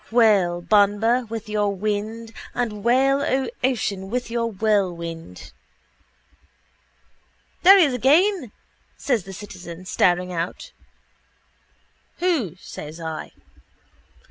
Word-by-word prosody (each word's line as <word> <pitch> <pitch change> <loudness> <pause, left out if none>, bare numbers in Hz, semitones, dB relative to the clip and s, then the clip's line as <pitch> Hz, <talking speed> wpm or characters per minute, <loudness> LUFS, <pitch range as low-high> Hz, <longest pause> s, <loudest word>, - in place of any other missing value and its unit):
Wail, 200 -7 +3
Banba, 215 +5 +3
with 225 -1 -6
your 210 -1 0
wind: 215 +3 -3 0.2
and 215 -4 -3
wail, 270 +4 +3
O 265 -1 0
ocean, 205 -7 -1
with 245 +1 -3
your 230 0 0
whirlwind. 175 - -2 2.1
—There 390 +2 +9
he 365 - +6
is 275 - -1
again, 295 - +3 0.5
says 240 -9 -1
the 195 - -8
citizen, 185 -3 -9
staring 180 0 +1
out. 170 0 -4 1.5
—Who? 305 - 0
says 155 -3 -9
I. 160 -1 -6
215 Hz, 100 wpm, -23 LUFS, 185-245 Hz, 2.1 s, There